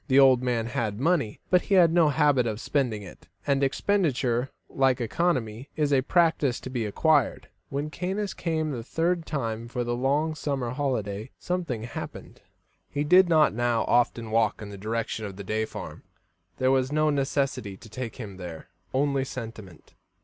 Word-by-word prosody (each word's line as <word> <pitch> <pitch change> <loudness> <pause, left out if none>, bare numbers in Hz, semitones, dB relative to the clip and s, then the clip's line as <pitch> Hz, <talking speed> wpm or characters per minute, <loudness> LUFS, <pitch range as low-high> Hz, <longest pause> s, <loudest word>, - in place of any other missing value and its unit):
The 135 -2 +3
old 130 -2 +7
man 120 -3 0
had 110 -3 -2
money, 145 -7 +1
but 180 -1 +5
he 200 - +1
had 170 -3 +6
no 170 -3 +5
habit 145 -4 +3
of 110 -1 -3
spending 120 -7 -1
it, 95 - -13 0.2
and 140 -1 +2
expenditure, 135 -6 +1 0.2
like 135 -2 +2
economy, 125 -2 -1
is 150 -2 +1
a 135 - +4
practice 155 -4 +2
to 130 - -7
be 120 -4 -1
acquired. 145 +4 +2 0.2
When 145 +2 -3
Caius 190 +4 -2
came 160 -2 -1
the 125 -4 -4
third 165 +5 -1
time 115 -5 -3
for 120 +1 -2
the 120 0 -1
long 145 +5 +1
summer 140 -5 -2
holiday, 125 -6 -2
something 170 -11 -3
happened. 115 - -8 0.5
He 145 0 -1
did 180 +4 +6
not 155 -6 +5
now 120 0 +1
often 115 -2 +1
walk 115 0 +2
in 105 - -7
the - - -7
direction 110 +1 -3
of 95 - -9
the 100 - -7
Day 110 +3 -1
farm; - - -8 0.6
there 130 0 +2
was 130 0 +2
no 155 0 +2
necessity 135 -7 -1
to 115 - -14
take 115 +1 -6
him 105 -6 -8
there, 85 -3 -8 0.3
only 140 0 +2
sentiment. 110 - -9
130 Hz, 175 wpm, -27 LUFS, 115-150 Hz, 0.6 s, old